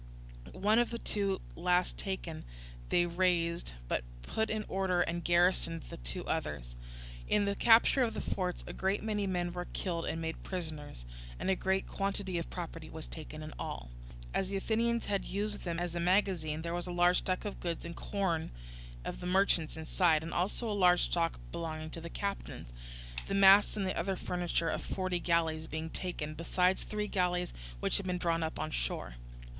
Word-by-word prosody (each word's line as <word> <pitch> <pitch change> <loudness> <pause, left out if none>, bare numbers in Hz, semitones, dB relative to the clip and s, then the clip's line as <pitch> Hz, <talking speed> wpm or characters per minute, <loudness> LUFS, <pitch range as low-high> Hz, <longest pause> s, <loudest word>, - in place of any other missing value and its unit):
One 210 +4 +3
of 240 - +3
the 235 - -3
two 200 -4 -1
last 180 +1 +2
taken 180 -5 -4 0.5
they 175 - +4
razed, 170 - +1
but - - 0 0.2
put 220 - -1
in 215 -1 -1
order 185 -2 +1
and 170 0 -1
garrisoned 175 -1 +3
the - - -6
two - - -3
others. - - -2 0.5
In 205 -1 +3
the 200 - +1
capture 230 +5 +6
of 235 -3 +1
the - - -1 0.2
forts 180 -2 -2
a - - -6
great 190 +2 0
many 210 -2 0
men 175 -2 -1
were 180 0 -4
killed 170 -3 -2
and 160 - -1
made 160 0 -3
prisoners, 155 - -5 0.3
and - - 0
a - - +3
great 190 +1 0
quantity 195 -2 -1
of 165 - -5
property 165 -3 -6
was 160 -1 -6
taken 155 -1 -7
in 155 - -7
all. - - -5 0.4
As 190 - 0
the 200 - -1
Athenians 230 +3 +1
had 200 -2 0
used 205 +1 -3
them 170 -1 -1
as 175 -1 -2
a 175 - -2
magazine, 170 -4 +2
there 170 0 -2
was 175 +1 -3
a - - -3
large 175 +1 +4
stock 185 +3 -2
of 205 - -4
goods 170 -2 -3
and 170 0 -6
corn 180 -6 -1 0.6
of - - -4
the 180 - -4
merchants 180 -4 +3
inside, 160 0 +3
and 165 - -5
also 195 +6 0
a 215 - 0
large 180 -3 +5
stock 165 -1 +1
belonging 160 -2 -4
to 165 - -7
the 170 - -6
captains; 195 - -4 0.5
the 195 - -1
masts 195 +2 +7
and 195 -2 0
other 195 0 -1
furniture 175 -2 -1
of - - -2
forty 185 -2 -1
galleys 165 -2 +1
being 160 +1 -4
taken, 155 -4 -3
besides 180 +3 +2
three 210 0 -2
galleys 180 -2 0 0.3
which - - +2
had 200 - -3
been 180 0 0
drawn 165 -2 +1
up 160 0 -2
on - - -2
shore. - - -3
180 Hz, 190 wpm, -33 LUFS, 165-195 Hz, 0.6 s, masts